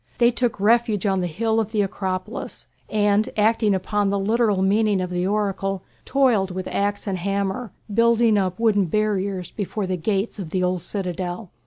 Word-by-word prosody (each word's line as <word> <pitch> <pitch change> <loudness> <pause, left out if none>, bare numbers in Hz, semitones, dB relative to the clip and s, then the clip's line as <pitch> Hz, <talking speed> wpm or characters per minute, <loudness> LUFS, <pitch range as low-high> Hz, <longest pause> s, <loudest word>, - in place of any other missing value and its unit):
They 240 0 +5
took 240 -3 -1
refuge 220 0 +2
on 195 -2 +2
the 180 - -1
hill 220 +7 0
of 220 -1 -2
the 210 -2 +2
Acropolis, 185 -1 -4 0.2
and 210 +2 +2
acting 215 -1 +3
upon 205 +2 0
the 200 - +1
literal 210 -1 +2
meaning 205 0 +2
of 180 -1 -3
the 180 +1 0
oracle 195 -2 -1 0.2
toiled 245 -8 +2
with 185 0 -5
axe 205 0 -1
and 190 -3 -2
hammer, 200 +4 -2 0.2
building 230 0 +4
up 190 -1 0
wooden 210 -4 +3
barriers 195 -1 -1
before 205 0 -3
the 185 0 -2
gates 200 +4 -1
of 180 -5 -5
the 185 +2 -1
old 180 -1 0
citadel. 180 +1 -4
200 Hz, 175 wpm, -23 LUFS, 185-220 Hz, 0.2 s, They